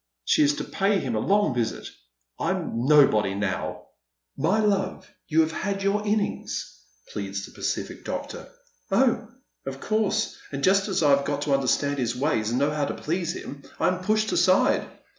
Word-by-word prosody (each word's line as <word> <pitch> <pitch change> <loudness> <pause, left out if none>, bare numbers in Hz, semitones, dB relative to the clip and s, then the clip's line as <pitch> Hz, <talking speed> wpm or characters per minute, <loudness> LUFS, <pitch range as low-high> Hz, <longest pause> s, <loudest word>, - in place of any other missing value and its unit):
She - - +3
is 145 0 +4
to - - -4
pay 200 +1 +1
him 130 -10 -2
a 110 - 0
long 205 - +2
visit. 120 -2 -2 0.5
I'm 120 +3 -1
nobody 120 -10 +5
now." 100 -2 -3 0.5
"My 175 +10 +1
love, 195 -3 0 0.2
you 160 0 +4
have 160 0 +1
had 195 +3 -3
your 200 +1 +1
innings," 210 0 -2 0.4
pleads - - -4
the - - -14
pacific - - -4
doctor. - - -6 0.2
" - - -38
Oh, 235 -4 +2 0.4
of 135 0 -5
course, 215 +3 0
and 140 -1 -4
just 195 +3 +4
as 190 -5 0
I 145 - +5
have 140 0 +4
got 145 0 -1
to 145 - 0
understand 140 +1 +1
his 120 -1 -1
ways 125 -5 0
and 120 - 0
know 140 +3 +2
how 150 -1 0
to - - -4
please 170 +1 -2
him 140 0 -8 0.2
I - - +3
am 185 0 -3
pushed 215 +2 +1
aside." 185 0 +3
155 Hz, 180 wpm, -25 LUFS, 135-200 Hz, 0.5 s, nobody